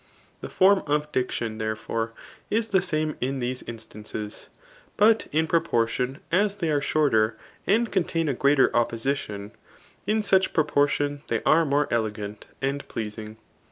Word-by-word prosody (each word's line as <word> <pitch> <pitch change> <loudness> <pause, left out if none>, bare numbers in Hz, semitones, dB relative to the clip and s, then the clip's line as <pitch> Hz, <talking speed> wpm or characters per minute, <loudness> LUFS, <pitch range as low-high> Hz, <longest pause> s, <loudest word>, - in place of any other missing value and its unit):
The - - -7
form 190 +1 +4
of 150 +1 0
diction, 120 -4 -2
therefore, 110 +1 -3 0.4
is 225 +1 0
the 190 -2 +3
same 155 -4 -1
in 135 +2 -1
these 125 +1 -3
instances; 110 -2 -7 0.5
but 220 +2 +4
in 160 +2 +2
proportion 125 -5 0
as 200 +3 +2
they 170 -6 -1
are 145 -1 +2
shorter, 110 -8 +2 0.3
and 225 +5 +2
contain 165 -3 0
a 140 - +1
greater 140 +1 +3
opposition, 115 -3 -1 0.6
in 215 0 +1
such 190 -2 +3
prQpQr<( 145 -2 +3
tion 145 0 -1
they - - -1
are 165 +1 +4
niore 145 0 +2
elegant 105 -2 -3 0.2
and 140 +1 -2
pleasing. 110 0 -6
140 Hz, 145 wpm, -25 LUFS, 115-165 Hz, 0.6 s, form